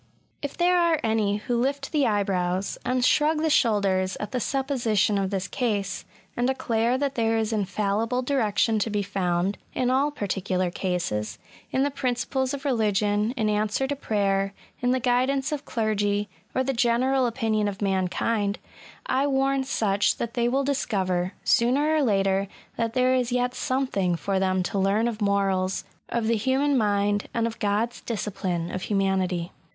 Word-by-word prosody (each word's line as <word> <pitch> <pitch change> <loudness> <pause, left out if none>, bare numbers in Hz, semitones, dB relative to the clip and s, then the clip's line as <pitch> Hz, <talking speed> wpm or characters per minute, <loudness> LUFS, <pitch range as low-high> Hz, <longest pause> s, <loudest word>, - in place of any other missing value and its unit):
If 285 - -5
there 355 +1 +3
are 335 -2 +3
any 215 -2 +1
who 235 +2 -1
lift 275 +2 -1
the 295 -4 +2
eyebrows, 190 -3 0
and 255 0 +1
shrug 305 +3 +3
the 320 - +2
shoulders 195 -7 +2
at 210 - -5
the 255 - -1
supposition 235 -6 +1
of 195 -1 -1
this 195 -1 -2
case, 200 -6 -2 0.3
and 245 +1 +1
declare 240 -2 +1
that 275 0 -1
there 225 -3 +1
is 220 0 -1
infallible 210 +4 0
direction 225 -4 +1
to 215 - 0
be 205 -1 -1
found, 185 -1 -1 0.2
in 255 0 +1
all 275 +3 +3
particular 190 -7 -2
cases, 175 - -2 0.3
in 265 - +1
the 285 - 0
prin* 255 -3 -1
ciples 260 +2 -1
of 280 0 -5
religion, 210 -2 +1
in 220 -3 +1
answer 210 +4 0
to 285 +2 -2
prayer, 195 -5 0 0.3
in 245 - +1
the 255 +1 +2
guidance 260 +4 +1
of 295 -1 -3
clergy, 210 -2 0 0.3
or 260 - +2
the 270 +1 -1
general 250 +2 +2
opinion 225 -3 0
of 200 -1 -4
man 190 -2 +1
kind, 205 +1 -1 0.5
I 270 +2 +1
warn 270 0 +1
such 205 -6 +1
that 235 -1 -4
they 240 -1 +1
wiU 270 +3 +1
discoyer, 190 -10 -1
sooner 275 +6 +3
or 310 - +3
later, 195 -5 +2 0.3
that 230 -1 -2
there 255 0 +3
is 250 -1 +1
yet 250 0 0
something 255 -10 0
for 190 +4 -1
them 185 -1 +1
to 200 +2 -2
learn 200 +4 +2
of 225 -2 -4
morals, 195 -2 +1 0.3
of 235 -1 -1
the 230 0 +2
human 265 +5 +1
mind, 205 -3 +1
and 230 -1 +1
of 230 0 -4
God's 215 +3 -1
discipline 190 -6 -3
of 185 - -4
humanity. 190 -4 0
220 Hz, 170 wpm, -25 LUFS, 195-255 Hz, 0.5 s, there